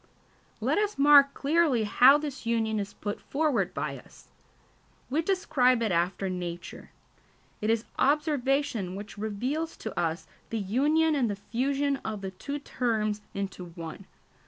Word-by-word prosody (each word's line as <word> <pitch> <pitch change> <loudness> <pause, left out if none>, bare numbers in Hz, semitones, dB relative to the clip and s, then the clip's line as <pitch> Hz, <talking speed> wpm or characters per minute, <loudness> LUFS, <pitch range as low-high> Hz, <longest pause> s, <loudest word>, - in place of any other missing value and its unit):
Let - - +1
us 420 0 -1
mark 280 0 +7
clearly 290 -5 +2
how 255 +6 +6
this 295 -2 -6
union 220 -2 +1
is 200 0 -4
put 205 0 -5
forward 300 -2 0
by - - -3
us. - - -18 0.8
We 305 +4 +2
describe 260 -10 +2
it 220 - 0
after 180 +3 0
nature. 175 -2 -6 0.7
It 215 - 0
is 225 0 +1
observation 275 - +1
which 205 +1 -8
reveals 255 +10 -3
to 220 - -6
us 165 0 -1 0.2
the 225 - -2
union 290 +10 +2
and 260 -6 +1
the 205 - -2
fusion 275 +7 -1
of 215 -5 -5
the 190 -1 -5
two 280 +10 -5
terms 220 -7 -1
into 195 -2 -4
one. 170 +2 -9
235 Hz, 145 wpm, -28 LUFS, 205-285 Hz, 0.8 s, mark